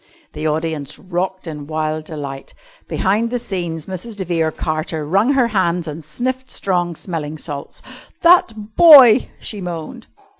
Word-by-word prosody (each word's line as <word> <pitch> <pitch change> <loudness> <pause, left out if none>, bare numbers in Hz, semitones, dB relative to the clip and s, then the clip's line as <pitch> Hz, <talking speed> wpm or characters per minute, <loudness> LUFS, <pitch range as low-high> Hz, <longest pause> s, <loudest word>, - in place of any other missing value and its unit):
The 155 +1 -3
audience 155 -2 -3
rocked 185 +1 -4
in 150 -3 -7
wild 155 0 -2
delight. 140 -4 -7 0.3
Behind 210 +5 0
the 245 - -1
scenes 175 -8 -4
Mrs. 190 +4 -6
de 195 -2 -4
Vere 165 -2 0
Carter 155 0 -3
wrung 200 - +2
her 255 -4 +2
hands 180 -5 0
and 155 +1 -6
sniffed 255 - -4
strong 175 -3 -1
smelling 155 -3 -5
salts. 145 -2 -7 0.4
"That 220 -12 +3
boy!" 270 -8 +8
she 210 -3 -5
moaned. 180 +7 -7
175 Hz, 145 wpm, -19 LUFS, 155-215 Hz, 0.4 s, boy